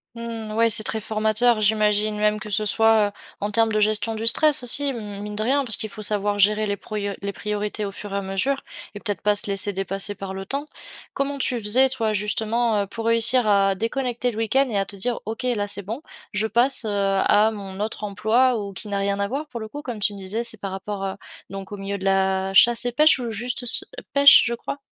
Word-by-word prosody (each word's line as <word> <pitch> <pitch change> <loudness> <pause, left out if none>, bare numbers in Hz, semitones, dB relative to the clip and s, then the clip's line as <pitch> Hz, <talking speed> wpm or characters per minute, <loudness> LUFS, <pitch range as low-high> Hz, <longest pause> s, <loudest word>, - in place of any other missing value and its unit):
Mmh 230 -2 -6
ouais, 230 +1 +3
c'est 215 0 +7
très 220 - -1
formateur. 220 +2 +1
J'imagine 210 0 +2
même 210 0 +1
que 210 - -9
ce 210 +1 0
soit, 220 0 +3
heu, - - -16 0.3
en 205 +1 -3
termes 225 +1 +2
de 215 - +1
gestion 215 +1 0
du 220 +1 -4
stress 295 +3 +4
aussi 275 +3 +2
mine 210 -2 -7
de 215 - -2
rien, 275 +5 +1
parce 230 -5 -2
qu'il 220 - -5
faut 215 - -9
savoir 205 -1 0
gérer 210 +2 +3
les 200 -1 -2
pruo 215 - -9 0.3
les 200 0 -4
priorités 210 +1 -3
au 200 - -5
fur 205 0 -8
et - - -2
à - - -1
mesure 195 +9 -1 0.3
et - - -6
peut-être 205 -1 -3
pas 210 0 +2
se 205 - +1
laisser 200 0 +1
dépasser 195 +1 0
par 195 0 -7
le 195 0 -6
temps. 280 +7 -4 0.5
Comment 280 +1 -2
tu 255 -2 -1
faisais, 250 +6 +3
toi, 230 -5 -1
justement, 215 +1 0
heu, - - -8
pour 225 +3 -6
réussir 230 +2 +3
à 195 -1 +3
déconnecter 245 +3 -2
le 215 - -10
week-end 245 +5 +1
et 210 - -2
à 195 - 0
te 200 - -11
dire: 235 +5 -2
«OK, 220 +3 -5
là 230 -5 -1
c'est 200 0 -1
bon, 225 +8 -5 0.3
je 210 +1 0
passe, 245 +2 +3
heu, - - -2
à 200 +1 +2
mon 195 -3 -8
autre 215 0 -4
emploi»? 220 +5 +1
Ou 200 -1 -7
qui 200 - -6
n'a 200 -1 -2
rien 200 0 -1
à 200 - 0
voir 280 +7 -4
pour 240 - -6
le 220 - -6
coup, 290 +7 -8
comme 245 -6 -6
tu 205 0 +1
me - - -9
disais, 200 +5 -3
c'est 220 -2 -2
par 195 -1 -5
rapport, 195 +1 -5
heu, 190 - -4 0.4
donc 195 0 -8
au 205 - -6
milieu 195 +1 -4
de 190 - -7
la 190 0 +1
chasse 235 +3 +6
et 245 - 0
pêche 305 +3 +4
ou 240 -2 -4
juste 240 +3 -2
s 245 - -3
ch - - -6 0.2
heu, - - -14
pêche, 280 0 +8
je 235 - -1
crois? 280 +4 -6
215 Hz, 250 wpm, -23 LUFS, 200-235 Hz, 0.5 s, pêche